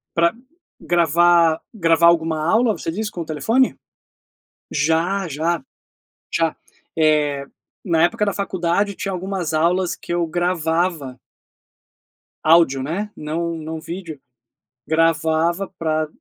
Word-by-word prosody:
Pra 170 0 +3 0.5
gravar 170 -1 +3
gravar 165 -3 +3
alguma 165 -2 +3
aula, 225 +6 +3
você 165 -3 -4
diz, 210 +3 -3
com 175 - -5
o 160 - -9
telefone? 225 - +1 1.0
Já 165 +6 +1
já 160 +1 -1 0.7
já, 165 -1 +1 0.4
eh, 150 -3 +2 0.4
na 165 -3 +2
época 210 +3 +1
da 200 - 0
faculdade 195 +1 -1
tinha 195 +1 -4
algumas 180 -3 -3
aulas 175 +3 +1
que - - -7
eu 175 -1 0
gravava 165 -4 -1 1.3
áudio, 155 -5 +4
né, 195 +9 -3
não 165 +2 -3
não 160 0 -6
vídeo, 165 -4 -7 0.7
gravava 165 +3 +1
pra 155 -1 -1
170 Hz, 115 wpm, -21 LUFS, 160-180 Hz, 1.3 s, áudio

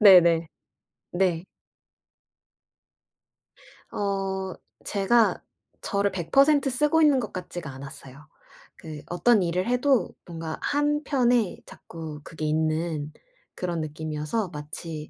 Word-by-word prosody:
네네. 170 -5 +7 0.7
네. 175 -2 +1 2.5
어 195 -2 -2 0.3
제가 215 +3 +3 0.4
저를 200 0 0
100% 275 - +3
쓰고 295 +5 +3
있는 295 -4 +5
것 220 -5 -5
같지가 175 -5 -6
않았어요. 135 +2 -11 0.5
그 155 -2 -9
어떤 200 +3 +3
일을 180 +4 -1
해도 250 +1 +2 0.2
뭔가 165 -2 -5
한편에 280 -7 +1
자꾸 155 -3 -9
그게 155 -1 -6
있는 155 0 0 0.4
그런 175 -3 -2
느낌이어서 155 +6 -3
마치 155 0 -7
180 Hz, 185 characters per minute, -26 LUFS, 160-230 Hz, 2.5 s, 네네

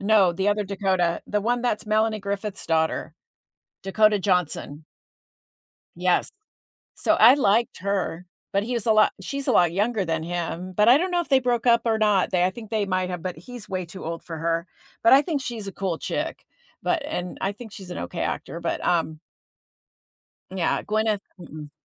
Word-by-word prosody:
no, 200 -3 +4
the 190 +3 0
other 205 0 +1
Dakota. 190 -3 0
The 210 - 0
one 240 +3 0
that's 230 -3 -1
Melanie 215 0 +1
Griffith's 200 0 -4
daughter. 160 -1 0 0.7
Dakota 210 +2 +3
Johnson. 180 -5 -1 1.1
Yes. 180 +1 +1 0.7
So - - +2
I 240 +5 +8
liked 235 -4 +2
her, 185 -2 -2 0.3
but 200 -1 +1
he 240 +4 -3
was 235 -4 -2
a 225 - +4
lot 215 0 +5
she's 275 +8 -4
a - - +4
lot 175 -2 +4
younger 205 +3 0
than 165 -2 -2
him, 175 +1 -4
but 210 +3 +4
I 250 - +8
don't 360 +4 -1
know 350 -1 +2
if 340 - -9
they 270 -2 +5
broke 245 -1 0
up 235 -1 +5
or 225 -1 +2
not. 210 -3 +2
They 180 -2 +2
I 180 - +3
think 220 +2 -10
they 215 -2 0
might 185 -1 -1
have, 180 -2 -4
but 180 0 -5
he's 235 +6 -10
way 185 -1 -3
too 180 +3 -10
old 165 0 -5
for 165 -2 -7
her. 165 +1 -1 0.4
But 230 - +7
I 275 - +8
think 300 -3 -2
she's 230 -5 -5
a - - -4
cool 190 -4 -3
chick. - - -4 0.4
But 315 - 0
and 180 - -4
I 195 - 0
think 220 +2 -11
she's 190 -3 -10
an - - -5
okay 85 - -4
actor, 170 - -3
but, 170 - -3
um 160 -2 0 1.3
Yeah, 185 -3 0
Gwyneth. 215 -1 0 0.2
Mm-mm. 150 -3 -9
195 Hz, 195 wpm, -24 LUFS, 175-220 Hz, 1.3 s, I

